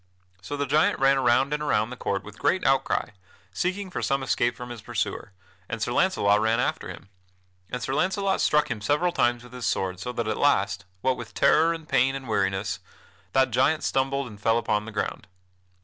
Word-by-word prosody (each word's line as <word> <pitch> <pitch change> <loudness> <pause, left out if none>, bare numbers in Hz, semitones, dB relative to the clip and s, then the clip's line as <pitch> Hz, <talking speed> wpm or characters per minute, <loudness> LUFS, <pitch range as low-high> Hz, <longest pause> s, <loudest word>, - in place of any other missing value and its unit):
So 120 +11 -5
the 145 - 0
giant 150 +3 +3
ran 135 0 +4
around 130 +3 +3
and 150 - -1
around 110 -6 +1
the - - -5
court 100 -4 -2
with 105 0 -12
great 185 - +1
outcry, 135 -4 +1 0.4
seeking 185 - -2
for - - -3
some 135 0 0
escape 120 -2 +1
from 125 -1 -7
his 120 -3 -8
pursuer, 105 - -3 0.4
and 115 - -3
Sir 110 - -1
Launcelot 105 - +3
ran 110 +1 +2
after 125 - -1
him. - - -10 0.6
And 125 -1 -4
Sir 130 - -2
Launcelot 190 +4 +1
struck 150 -2 +2
him 110 -3 -3
several 150 +10 +1
times 120 -6 +1
with 125 0 -14
his 125 -3 -3
sword, 95 -1 -1
so 125 - -4
that 120 -2 -2
at 110 - -1
last, 105 -7 +1 0.2
what 130 +3 +1
with 120 - -9
terror 165 +1 +4
and 165 -2 -6
pain 135 +2 +2
and 135 -2 -7
weariness, 100 -1 -1 0.5
that 130 -1 +3
giant 135 +6 +2
stumbled 135 +1 0
and 105 -4 -11
fell 115 +2 +3
upon 105 -2 0
the 115 - -7
ground. 105 - -3
125 Hz, 205 wpm, -26 LUFS, 110-145 Hz, 0.6 s, ran